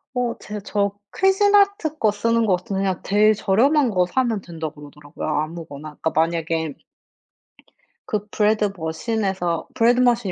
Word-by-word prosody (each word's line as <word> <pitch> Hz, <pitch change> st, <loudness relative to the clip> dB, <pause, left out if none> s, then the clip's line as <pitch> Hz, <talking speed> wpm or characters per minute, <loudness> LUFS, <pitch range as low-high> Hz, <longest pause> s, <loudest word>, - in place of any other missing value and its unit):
어 245 Hz, -1 st, -1 dB
제 210 Hz, 0 st, -7 dB
저 200 Hz, -1 st, 0 dB, 0.2 s
쿠진아트 400 Hz, -3 st, +3 dB
거 215 Hz, -7 st, +2 dB
쓰는 230 Hz, +2 st, +1 dB
것 185 Hz, -4 st, +3 dB
같은데 195 Hz, +2 st, -4 dB
그냥 190 Hz, -3 st, -1 dB
제일 210 Hz, +2 st, +4 dB
저렴한 245 Hz, +7 st, +2 dB
거 180 Hz, -3 st, +2 dB
사면 230 Hz, +1 st, 0 dB
된다 165 Hz, -3 st, -6 dB
그러더라고요 145 Hz, 0 st, -9 dB
아무거나. 155 Hz, -1 st, -4 dB
그러니까 -, -, +1 dB
만약에 165 Hz, -1 st, 0 dB, 1.4 s
그 210 Hz, -1 st, -2 dB
브래드 210 Hz, -1 st, +2 dB
머신에서 180 Hz, 0 st, -2 dB
브래드 240 Hz, +2 st, +4 dB
머신이 240 Hz, -5 st, +2 dB
205 Hz, 330 characters per minute, -22 LUFS, 165-235 Hz, 1.4 s, 제일